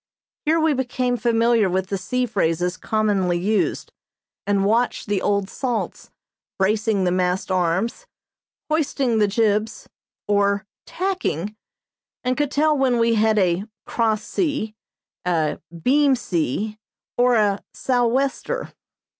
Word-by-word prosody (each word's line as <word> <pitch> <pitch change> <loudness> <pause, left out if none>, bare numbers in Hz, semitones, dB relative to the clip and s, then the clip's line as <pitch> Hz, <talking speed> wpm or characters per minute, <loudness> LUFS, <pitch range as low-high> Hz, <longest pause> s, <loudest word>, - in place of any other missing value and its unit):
Here 325 +2 +4
we 315 -1 +3
became 250 -1 -1
familiar 230 -3 +2
with 185 +1 -1
the 195 - -1
sea 250 +7 -1
phrases 180 -5 0
commonly 200 -5 0
used, 205 +5 -1 0.5
and 200 -1 +2
watched 230 +3 +1
the 200 -2 -1
old 200 -1 +1
salts 245 +3 -3 0.5
"bracing 210 +1 +1
the 180 - +2
mast 180 +1 0
arms," 185 - 0 0.6
"hoisting 275 -6 +1
the 210 - +4
jibs," 215 +1 0 0.4
or 200 0 +2 0.2
"tacking," 340 - -2 0.7
and 255 0 +1
could 290 0 0
tell 305 +2 +2
when 265 -3 +2
we 230 0 +3
had 220 0 +3
a 185 0 +2 0.2
"cross 220 -2 0
sea," 290 - -2 0.5
a 165 -4 0 0.2
"beam 280 +1 +4
sea," 210 - -2 0.4
or 245 0 +4
a 205 -2 +2
"sou' 245 -2 +1
wester." 275 - -1
220 Hz, 125 wpm, -22 LUFS, 195-250 Hz, 0.7 s, Here